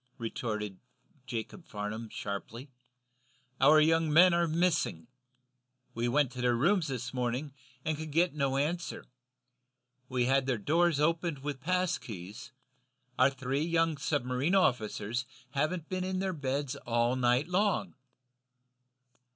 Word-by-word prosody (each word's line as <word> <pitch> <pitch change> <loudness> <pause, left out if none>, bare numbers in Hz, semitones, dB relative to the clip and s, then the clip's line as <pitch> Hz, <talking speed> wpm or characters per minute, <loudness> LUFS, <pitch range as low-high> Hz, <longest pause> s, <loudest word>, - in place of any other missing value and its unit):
retorted 105 -4 -4 0.5
Jacob 120 - -5
Farnum, 110 +2 -5
sharply. 115 +8 -6 0.9
"Our 150 +3 +7
young 160 0 +3
men 175 +3 +7
are 170 0 +2
missing. 160 - 0 0.9
We 120 +1 -1
went 135 +1 +2
to 125 0 -6
their 125 -1 +3
rooms 160 - +2
this 125 -3 -4
morning, 125 +3 -2 0.3
and 155 - 0
could 155 +1 -6
get 170 +3 +2
no 140 -2 0
answer. 165 +5 -2 1.0
We've 125 -2 +1
had 135 +1 +2
their 130 -3 +1
doors 160 +7 +2
opened 165 -2 0
with 145 -2 -4
pass 180 +2 0
keys 105 +3 -9 0.7
our 130 +2 +6
three 135 +1 -2
young 165 0 +1
submarine 140 +2 0
officers 120 - +1 0.2
haven't 155 +5 -1
been 185 0 -2
in 185 0 -2
their 190 0 -1
beds 140 -2 -2
all 120 0 +1
night 125 +3 +2
long!" 195 +1 +1
140 Hz, 130 wpm, -31 LUFS, 120-165 Hz, 1.0 s, Our